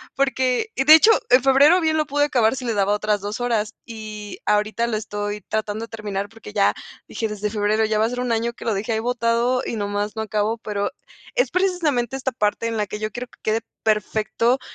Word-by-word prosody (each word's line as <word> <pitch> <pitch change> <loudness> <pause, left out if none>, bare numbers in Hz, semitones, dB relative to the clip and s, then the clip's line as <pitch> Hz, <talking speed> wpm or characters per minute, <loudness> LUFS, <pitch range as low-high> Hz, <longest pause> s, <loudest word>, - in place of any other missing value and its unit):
porque 265 - +1
de 300 +4 +8
hecho, 430 +8 +6 0.2
en 250 +1 +5
febrero 285 +7 +6
bien 315 -1 +1
lo 305 - +1
pude 290 0 +2
acabar 245 -4 +2
si 260 - -6
le 230 - 0
daba 200 -1 +2
otras 210 0 0
2 205 +4 -4
horas 225 -3 0
y 215 -2 -8
ahorita 210 +3 +1
lo 230 - -1
estoy 205 -1 -4
tratando 215 +2 -3
de - - -21
terminar 205 -2 -4
porque 225 -1 -12
ya 200 -2 +3 0.4
dije 225 - -2
desde 210 0 -3
febrero 210 +1 +1
ya 215 0 0
va 220 - +3
a - - 0
ser 245 +1 -3
un 250 -1 -1
año 235 +1 -1
que - - -11
lo 225 - +1
dejé 210 +4 -2
ahí 220 - 0
botado 240 +1 +1
y - - -3
nomás 205 +1 -2
no 220 - -2
acabo, 215 +1 -1
pero 205 0 -2 0.4
es - - +2
precisamente 320 - 0
esta 265 0 -2
parte 220 0 0
en 230 - -2
la 210 -1 -1
que 210 - -6
yo 215 0 -3
quiero 245 +3 -6
que - - -22
quede 220 +1 0 0.2
perfecto 220 +3 +1
225 Hz, 225 wpm, -22 LUFS, 210-250 Hz, 0.4 s, de